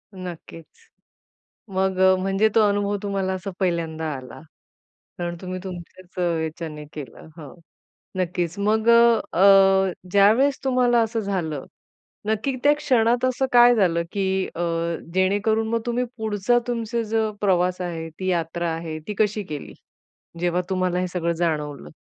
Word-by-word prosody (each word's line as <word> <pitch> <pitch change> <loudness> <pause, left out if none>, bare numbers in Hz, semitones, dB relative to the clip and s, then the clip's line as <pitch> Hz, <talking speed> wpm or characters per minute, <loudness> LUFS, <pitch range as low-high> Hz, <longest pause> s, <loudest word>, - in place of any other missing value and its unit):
नक्कीच. 170 -3 -9 1.1
मग 190 0 0
अ, 190 0 +6
म्हणजे 195 +3 +2
तो 225 - +5
अनुभव 205 0 0
तुम्हाला 195 -2 -1
असा 190 +1 -4
पहिल्यांदा 165 -3 -1
आला. 130 -1 -10 0.8
कारण 175 -1 -3
तुम्ही 185 0 -5
तुमच्याच 185 0 -10
अ, - - -1 0.2
ह्याच्याने 160 -1 -5
केलं. 140 -3 -9
हां. 150 -4 -10 0.6
नक्कीच. 180 0 -2
मग 215 +2 +1
अ, 235 0 +6 0.2
अ, 195 -1 +6 0.2
ज्यावेळेस 220 +8 +4
तुम्हाला 250 -2 +3
असं 225 0 -1
झालं, 175 -9 -3 0.6
नक्की 220 +5 0
त्या 290 +1 +6
क्षणात 245 -4 +2
असं 255 +1 0
काय 245 0 +7
झालं, 170 -6 +2
की 190 -1 0
अ, 170 - -3 0.5
जेणेकरून 205 +4 +1
मग 230 0 0
तुम्ही 240 +1 0
पुढचा 220 +2 +1
तुमचा 235 -1 -2
जो 220 -1 +1
प्रवास 180 -2 +1
आहे, 165 -2 -4
ती 185 - -3
यात्रा 170 0 -1
आहे, 160 -1 -6
ती 210 - -3
कशी 210 -1 +1
केली? 150 -2 -6 0.7
जेव्हा 175 +1 +1
तुम्हाला 185 -1 0
हे 185 - -1
सगळं 170 -1 -1
जाणवलं. 150 -4 -2
190 Hz, 140 wpm, -23 LUFS, 175-220 Hz, 1.1 s, काय